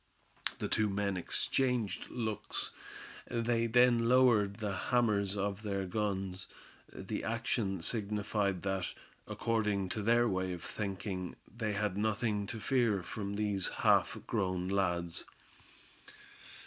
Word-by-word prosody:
The - - -2
two 110 -1 +2
men 100 0 0
exchanged 120 +5 0
looks. 110 -3 -3 0.6
Then 115 - -1 0.3
they 125 +1 +7
lowered 115 -4 +4
the 105 -3 -3
hammers 105 -2 +1
of 100 0 -1
their 100 -2 -2
guns. 95 -1 -2 0.4
The - - -5
action 110 -5 -1
signified 105 -3 -1
that, 95 -2 -1 0.3
according 105 -4 0
to 105 - -2
their 120 +3 +4
way 95 -2 0
of 85 -2 -7
thinking, 95 -3 -4 0.2
they 110 -3 -1
had 100 -2 -1
nothing 110 -1 0
to 110 - -5
fear 115 -6 +2
from 100 0 -4
these 100 -2 0
half - - +3
grown 95 -4 -1
lads. 85 -3 0
105 Hz, 120 wpm, -33 LUFS, 95-115 Hz, 0.6 s, they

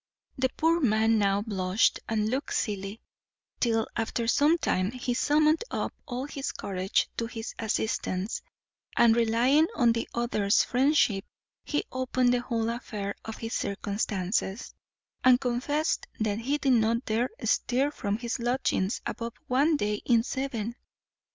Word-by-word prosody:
The 260 0 +1
poor 330 +1 +3
man 220 -4 +3
now 200 0 +2
blushed 190 -2 +1
and 215 -1 +1
looked 265 +6 -2
silly, 200 0 -2 0.6
till, 225 -2 +2
after 230 +1 -1
some 295 +7 +4
time, 185 - 0
he 250 +1 -3
summoned 305 - +3
up - - -2
all 255 0 -3
his 280 -1 -4
courage 190 -1 -1
to 230 - -1
his 225 0 -6
assistance, 215 -2 -1 0.6
and 235 -1 +6
relying 240 +7 +3
on 240 -5 +4
the 230 0 -2
other's 215 -4 +2
friendship, 250 -7 +2 0.4
he 295 - -1
opened 255 -1 +1
the 245 - +1
whole 230 -2 -1
affair 210 -4 -4
of 220 - -6
his 225 0 -5
circumstances, 200 +1 -2 0.5
and 255 -1 +6
confessed 275 +5 -1
that 215 -1 0
he 275 +6 0
did 275 -3 +2
not 230 +1 +2
dare 225 +3 0
stir 270 +4 +1
from 205 -7 -2
his 235 +1 -3
lodgings 240 -4 0
above 230 0 -4
one 290 +5 +3
day 210 -4 -1
in 235 -2 +4
seven. 240 -3 -3
235 Hz, 145 wpm, -28 LUFS, 215-260 Hz, 0.6 s, and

